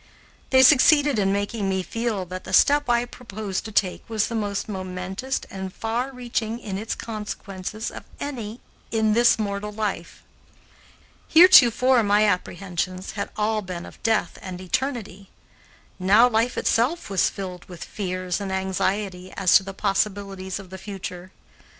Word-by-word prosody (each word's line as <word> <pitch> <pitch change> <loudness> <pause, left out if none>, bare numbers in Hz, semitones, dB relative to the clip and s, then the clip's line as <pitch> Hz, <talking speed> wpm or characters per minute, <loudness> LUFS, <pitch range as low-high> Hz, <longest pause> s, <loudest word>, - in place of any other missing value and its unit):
They 260 -1 +6
succeeded 290 -1 +6
in 195 -1 +2
making 205 0 -1
me 190 -1 0
feel 225 -3 -2
that 185 +1 -7
the - - -8
step 290 -2 +4
I 240 0 +3
proposed 215 -5 -6
to 220 - -6
take 195 +1 0
was 220 -2 0
the - - -5
most 205 -3 -2
momentous 190 +5 -4
and 190 -1 -5
far 235 +6 -3
reaching 240 -3 -3
in 200 -5 -5
its 220 - -3
consequences 210 -1 -6
of - - -9 0.2
any 240 -5 -6 0.3
in 220 -1 +1
this 235 +2 +5
mortal 205 -1 -3
life. 205 -5 -4 1.0
Heretofore 260 -8 +7
my 205 0 +3
apprehensions 185 -1 -2
had 200 -1 -4
all 215 0 0
been 180 -3 -6
of - - -14
death 225 -1 0
and 185 -2 -7
eternity; 200 -1 -3 0.7
now 205 +6 +6
life 235 +1 0
itself 250 +2 0
was 195 - +3
filled 185 -2 -7
with 175 -3 -9
fears 185 -2 -3
and 195 -1 -4
anxiety 190 0 -2
as 190 -3 +4
to - - -2
the 195 - -6
possibilities 195 -1 -2
of 195 -2 -11
the 190 - -8
future. 185 -2 -7
205 Hz, 150 wpm, -24 LUFS, 190-230 Hz, 1.0 s, Heretofore